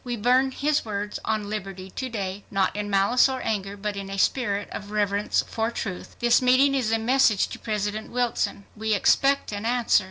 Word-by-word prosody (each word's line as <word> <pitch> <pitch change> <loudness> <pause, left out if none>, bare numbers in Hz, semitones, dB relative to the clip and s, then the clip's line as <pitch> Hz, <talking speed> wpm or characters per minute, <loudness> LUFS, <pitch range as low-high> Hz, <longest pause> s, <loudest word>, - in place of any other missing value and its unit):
We 245 -2 -3
burn 250 +4 +3
his 290 +3 0
words 205 -1 -4
on 215 -2 -1
liberty 195 -3 -6
to 260 +5 -4
day, 200 -3 -4
not 195 -1 0
in 205 0 -3
malice 200 +7 +4
or 260 -1 -3
anger, 200 -2 -2
but 205 0 -3
in 200 -1 -6
a 195 - -5
spirit 205 -1 0
of 205 - -7
reverence 205 -1 0
for 225 0 -1
truth. 195 -5 -6
"This 240 +1 +3
meeting 255 +2 +4
is 250 -5 0
a 225 - +3
message 225 -3 +3
to - - -8
President 210 0 -3
Wilson. 240 -4 -1
We 220 0 0
expect 275 +7 +2
an 205 0 -4
answer. 240 0 +3
215 Hz, 195 wpm, -25 LUFS, 200-245 Hz, -, malice